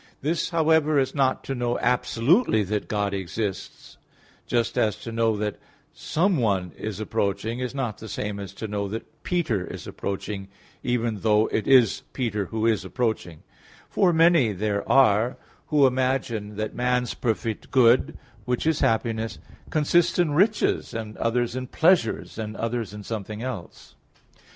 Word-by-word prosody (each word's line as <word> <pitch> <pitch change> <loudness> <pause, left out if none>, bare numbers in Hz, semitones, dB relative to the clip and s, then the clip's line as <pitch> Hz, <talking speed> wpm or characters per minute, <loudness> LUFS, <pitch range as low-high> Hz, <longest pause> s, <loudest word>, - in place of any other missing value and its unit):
This, 160 +3 0
however, 160 -2 +3
is 135 -1 +1
not 135 -3 +1
to 135 - -3
know 120 -1 -1
absolutely 125 - +2
that 105 +1 -2
God 100 -1 -1
exists; 100 +1 -5 0.5
just 120 -2 0
as 105 -3 +2
to 115 - -5
know 115 -1 +1
that 105 0 -3 0.3
someone 120 - 0
is 110 -2 -5
approaching 110 +1 -1
is 125 +1 -4
not 125 -6 -3
the 110 - -9
same 105 0 -4
as 100 -2 -6
to 110 - -5
know 100 -1 -2
that 115 +9 -8
Peter 150 - 0
is - - -8
approaching, 100 0 -5 0.3
even 120 -3 -1
though 105 +1 +3
it 110 - -1
is 125 -6 +5
Peter 110 -6 -1
who 110 +2 -2
is 110 -3 +2
approaching; 110 -10 -3 0.5
for 185 -3 +3
many 165 -8 +4
there 100 +1 -2
are 120 -3 +4 0.3
who 145 -2 +4
imagine 125 -5 0
that 110 +1 -3
man's 125 0 0
perfect 115 -2 -2
good 130 +3 +4 0.3
which 125 +2 -1
is 160 -2 +2
happiness, 115 -1 0 0.3
consists 170 +3 +2
in 175 -4 +2
riches, 200 - +1
and 110 -1 -5
others 120 +1 0
in 130 0 -4
pleasures, 160 -8 +2
and 110 0 -5
others 115 -2 -2
in 105 0 -8
something 110 +1 -5
else. 120 -9 -7
115 Hz, 150 wpm, -25 LUFS, 105-135 Hz, 0.5 s, is